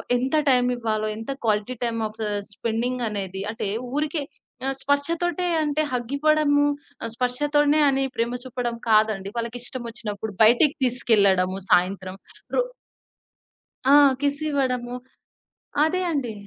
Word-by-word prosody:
ఎంత 260 +5 0
టైమ్ 250 -1 +4
ఇవ్వాలో, 215 -2 -1
ఎంత 225 +5 -5
క్వాలిటీ 215 +3 +1
టైమ్ 235 -1 -1
ఆఫ్ 215 +1 -7 0.3
స్పెండింగనేది 220 -4 -2
అంటే 220 - -4 0.3
ఊరికే 300 +1 -1 0.6
స్పర్శతోటే 335 +5 0 0.2
అంటే 300 +1 0
హగ్ 245 0 -3
ఇవ్వడము, 300 -1 +3 0.5
స్పర్శతోనే 290 +4 +2
అని 270 0 +1
ప్రేమ 235 +2 -1
చూపడం 245 -2 -3
కాదండి. 215 -3 +3
వాళ్ళకి 235 +1 -3
ఇష్టమచ్చినప్పుడు 225 -4 -6
బయటికి 245 +7 +5
తీసుకెళ్ళడము 200 -7 +3
సాయంత్రం. 185 +1 +2 0.4
రో - - +3 1.2
ఆ! 275 - +5 0.3
కిస్ 285 0 0
ఇవ్వడము 250 -3 -1 0.9
అదే 365 +3 0
అండి. 265 -7 -2
245 Hz, 110 wpm, -24 LUFS, 220-285 Hz, 1.2 s, బయటికి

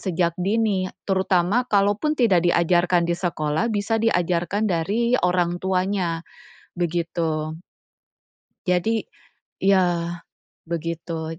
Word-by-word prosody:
sejak 175 -2 0
dini. 200 0 +1 0.2
Terutama 190 +4 +2
kalaupun 205 +9 +2
tidak 190 -8 +3
diajarkan 175 0 +3
di 170 - +2
sekolah, 160 +3 -1
bisa 210 +2 0
diajarkan 180 -1 +1
dari 210 +9 +1
orang 180 -1 +1
tuanya, 185 -3 0 0.6
begitu. 165 -2 -2 1.1
Jadi 210 +5 +1 0.6
iya, 175 -3 +2 0.5
begitu. 165 -1 -4
180 Hz, 90 wpm, -23 LUFS, 170-200 Hz, 1.1 s, tidak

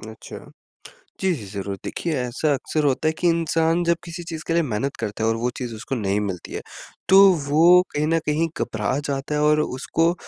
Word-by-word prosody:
अच्छा। - - -10 0.8
जी, 190 -1 +1
जी 110 - -8
ज़रूर। 100 0 -5
देखिए, 170 - -3
ऐसा 130 +4 0
अक्सर 150 +3 -2
होता 140 +3 +1
है 155 - +4
कि 175 - +2
इंसान 165 +1 +1
जब 170 0 +2
किसी 170 +1 -7
चीज़ 160 -2 -6
के 165 - 0
लिए 170 - +3
मेहनत 135 +1 -2
करता 110 0 -3
है 110 - +3
और 115 - +1
वो 120 +2 -1
चीज़ 120 -3 -5
उसको 115 +5 -5
नहीं 100 -3 0
मिलती 95 -4 -5
है, - - -4 0.5
तो 190 - +7 0.3
वो 170 +5 +6
कहीं 150 +1 0
न 165 +1 +2
कहीं 155 +2 +1
घबरा 110 +2 -1
जाता 140 +1 -2
है 150 - +1
और 150 0 +4
उसको 165 +5 0
150 Hz, 210 wpm, -23 LUFS, 115-165 Hz, 0.8 s, तो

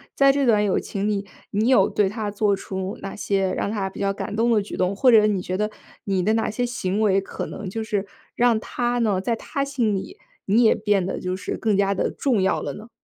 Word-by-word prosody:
在 275 0 +6
这 280 0 +1
段 215 -4 +4
友 200 -2 +1
情 200 +1 -3
里， 200 -1 -1 0.2
你 215 +3 0
有 200 -7 +5
对 205 - +2
她 210 +1 -3
做 205 0 +1
出 190 0 -5
哪 195 - -6
些 195 -2 0
让 200 - -2
他 200 -3 -2
比 - - -11
较 195 0 0
感 205 - -5
动 230 +2 +2
的 220 -2 +3
举 200 - -7
动？ 185 +2 0
或 255 +6 +4
者 215 -2 +7
你 205 -3 +1
觉 185 +1 -3
得， 210 +1 -1 0.3
你 195 -2 0
的 210 +4 +2
哪 225 0 +1
些 245 +3 -2
行 215 -4 -2
为， 195 -3 +3
可 195 - -6
能 205 - -7
就 225 +4 -4
是 210 -2 -2 0.3
让 240 -2 +3
她 240 +2 -2
呢 210 -5 +1
在 230 +5 -1
她 275 +4 -3
心 245 -7 0
里， 285 - -6 0.3
你 220 +5 +4
也 220 - +5
变 205 -2 +1
得 - - -3
就 180 0 -2
是 185 - -4
更 215 -2 +1
加 200 0 +2
地 - - 0
重 255 -7 0
要 190 - +1
了 - - -4
呢？ 220 +3 -11
210 Hz, 265 characters per minute, -23 LUFS, 195-225 Hz, 0.3 s, 者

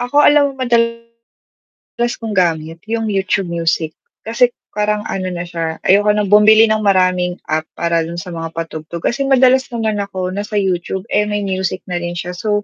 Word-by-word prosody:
Ako 245 +3 -3
alam 285 -2 +4
mo 260 - -2
madalas 230 -1 -2 0.8
kong 225 -2 -6
gamit, 165 -3 0
yung 225 -1 -1
YouTube 195 -2 0
Music, 165 -1 0 0.3
kasi 230 +3 +3 0.2
parang 210 0 -1
ano 185 -3 -3
na 175 -1 -4
siya, 165 -2 -5
ayoko 205 +2 +4
ng 205 -2 -1
bumili 215 +1 +7
ng 215 - +2
maraming 185 -3 +2
app 155 0 -2
para 170 -1 0
dun 170 - -6
sa 175 +1 -6
mga 165 -1 -6
patugtog. 165 0 -6
Kasi 275 +2 0
madalas 260 0 +4
naman 220 -3 -2
ako 185 -2 -3
nasa 205 +2 -5
YouTube, 190 -1 -1
eh, 210 0 +2
may 205 -1 -2
music 190 -1 -2
na 175 - -1
rin 175 0 -4
siya. 175 +1 -4
So, 205 +3 -1
195 Hz, 180 wpm, -17 LUFS, 175-220 Hz, 0.8 s, bumili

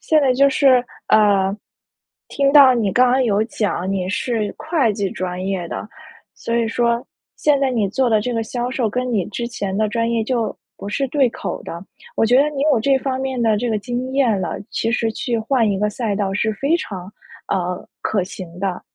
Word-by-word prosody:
现 310 -1 +3
在 270 -3 +3
就 275 +2 +4
是， 260 -2 +4 0.2
呃， 200 -2 +4 0.7
听 275 -1 +1
到 280 -3 +8
你 210 -5 0
刚 250 0 +4
刚 260 +1 +3
有 215 -3 +2
讲 205 -4 -2
你 185 -2 -1
是 220 +1 -2
会 310 -9 +1
计 200 -2 -2
专 185 0 -4
业 190 -3 -2
的， - - -5 0.5
所 230 0 -3
以 230 -1 +1
说 235 +1 0 0.3
现 295 -2 +3
在 270 -1 +2
你 220 -6 0
做 260 +5 +1
的 220 -2 +3
这 245 +4 -2
个 230 -1 -1
销 245 +2 -3
售 250 -4 0
跟 250 +3 -2
你 200 -5 +1
之 235 +3 -4
前 200 -5 -4
的 215 0 +1
专 230 +2 -1
业 230 -1 +1
就 235 -2 -1 0.2
不 200 - -7
是 275 +6 -1
对 270 -1 +2
口 - - -5
的， 170 +2 -7 0.3
我 - - +3
觉 245 +4 +5
得 295 - +3
你 280 -2 -3
有 230 - +2
这 270 +3 +3
方 265 0 -2
面 265 -2 -2
的 220 -2 +3
这 240 +2 -1
个 215 -2 0
经 245 +4 -4
验 235 -8 +2
了， 175 - -3
其 225 - -1
实 230 -1 0
去 235 +1 -2
换 230 0 +1
一 195 - -1
个 210 0 0
赛 215 -2 -2
道 195 -2 -1
是 215 +2 0
非 280 +10 +1
常， 190 - -7 0.4
呃， 180 -1 -2
可 205 -3 0
行 180 -2 -9
的。 190 -2 -2
230 Hz, 230 characters per minute, -20 LUFS, 200-255 Hz, 0.7 s, 到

